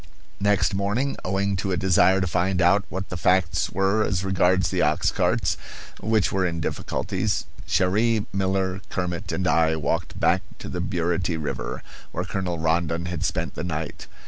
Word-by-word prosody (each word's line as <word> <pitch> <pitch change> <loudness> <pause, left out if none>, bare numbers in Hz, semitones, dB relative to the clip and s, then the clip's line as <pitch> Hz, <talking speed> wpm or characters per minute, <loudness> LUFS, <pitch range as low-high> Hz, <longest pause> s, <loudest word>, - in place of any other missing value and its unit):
Next 100 -1 +2
morning 105 +8 0
owing 95 +1 0
to 95 +1 -2
a 90 - +1
desire 95 0 +4
to - - +1
find 90 +2 0
out 90 +3 +4
what 95 +1 -5
the 90 - -4
facts 90 -1 +2
were 95 +3 +2
as 95 -3 0
regards 95 -2 +3
the - - +1
ox - - +2
carts, - - +1 0.4
which 110 -1 +1
were 95 -1 +1
in 85 -2 -1
difficulties - - -2 0.2
Cherrie, 105 +4 +2
Miller, 95 -1 0
Kermit, 90 -2 -3
and 95 - -1
I 80 -2 +3
walked 75 -3 -2
back - - +3 0.2
to - - -8
the 90 - -3
Burity 85 -2 -1
River, 75 -2 -4 0.3
where 90 - -2
Colonel 90 -2 -2
Rondon 80 +1 0
had 90 -2 -3
spent - - -1
the - - -5
night. 80 -3 -4
90 Hz, 170 wpm, -24 LUFS, 85-95 Hz, 0.4 s, desire